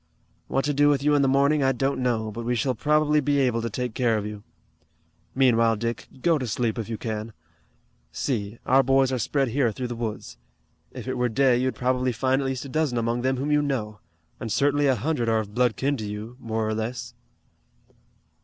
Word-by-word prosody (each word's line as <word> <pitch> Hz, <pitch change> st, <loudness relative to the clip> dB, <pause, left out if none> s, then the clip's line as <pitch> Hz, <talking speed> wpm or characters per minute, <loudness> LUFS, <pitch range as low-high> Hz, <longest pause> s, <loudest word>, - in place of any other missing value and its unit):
"What 135 Hz, -, 0 dB
to 145 Hz, -, 0 dB
do 145 Hz, +1 st, +4 dB
with 140 Hz, -1 st, +1 dB
you 150 Hz, 0 st, +3 dB
in 145 Hz, -, +4 dB
the 135 Hz, -, +3 dB
morning 140 Hz, +3 st, +3 dB
I 135 Hz, 0 st, +3 dB
don't 135 Hz, +1 st, -1 dB
know, 115 Hz, -3 st, 0 dB
but 115 Hz, +2 st, -6 dB
we 120 Hz, +1 st, 0 dB
shall 130 Hz, +3 st, 0 dB
probably 150 Hz, +4 st, +2 dB
be 145 Hz, 0 st, +1 dB
able 125 Hz, -4 st, +2 dB
to 115 Hz, -, -2 dB
take 125 Hz, +2 st, -3 dB
care 115 Hz, -3 st, +1 dB
of 105 Hz, -, -3 dB
you. 105 Hz, -1 st, -6 dB, 0.9 s
Meanwhile, 115 Hz, -4 st, +4 dB
Dick, 115 Hz, +1 st, -4 dB, 0.2 s
go 165 Hz, -3 st, +3 dB
to 130 Hz, -, -3 dB
sleep 115 Hz, +1 st, -1 dB
if 115 Hz, -, -5 dB
you 115 Hz, -, -3 dB
can. 110 Hz, -1 st, -5 dB, 0.8 s
See, 110 Hz, -5 st, -3 dB
our 135 Hz, +2 st, +5 dB
boys 135 Hz, 0 st, +3 dB
are 130 Hz, -, -1 dB
spread 135 Hz, +2 st, 0 dB
here 125 Hz, -1 st, +1 dB
through 125 Hz, +3 st, -5 dB
the 120 Hz, -, -4 dB
woods. 105 Hz, -, -5 dB, 0.5 s
If -, -, -8 dB
it 130 Hz, -1 st, -2 dB
were 125 Hz, 0 st, +2 dB
day 130 Hz, +2 st, +3 dB
you'd 130 Hz, +1 st, 0 dB
probably 125 Hz, 0 st, 0 dB
find 130 Hz, +3 st, +1 dB
at 135 Hz, -, -2 dB
least 130 Hz, 0 st, -3 dB
a -, -, -8 dB
dozen 150 Hz, -3 st, 0 dB
among 115 Hz, +1 st, 0 dB
them 130 Hz, +1 st, 0 dB
whom 140 Hz, +3 st, -2 dB
you 150 Hz, 0 st, +4 dB
know, 110 Hz, -8 st, -3 dB, 0.4 s
and 115 Hz, -3 st, -5 dB
certainly 145 Hz, +4 st, +2 dB
a 135 Hz, -, +3 dB
hundred 125 Hz, -3 st, -1 dB
are 110 Hz, -, +3 dB
of 105 Hz, -1 st, -9 dB
blood 125 Hz, -1 st, +2 dB
kin 140 Hz, +1 st, 0 dB
to 110 Hz, -, -5 dB
you, 105 Hz, +3 st, -7 dB
more 110 Hz, -2 st, -2 dB
or 110 Hz, -, -1 dB
less." 110 Hz, +3 st, -4 dB
125 Hz, 220 wpm, -25 LUFS, 115-135 Hz, 0.9 s, our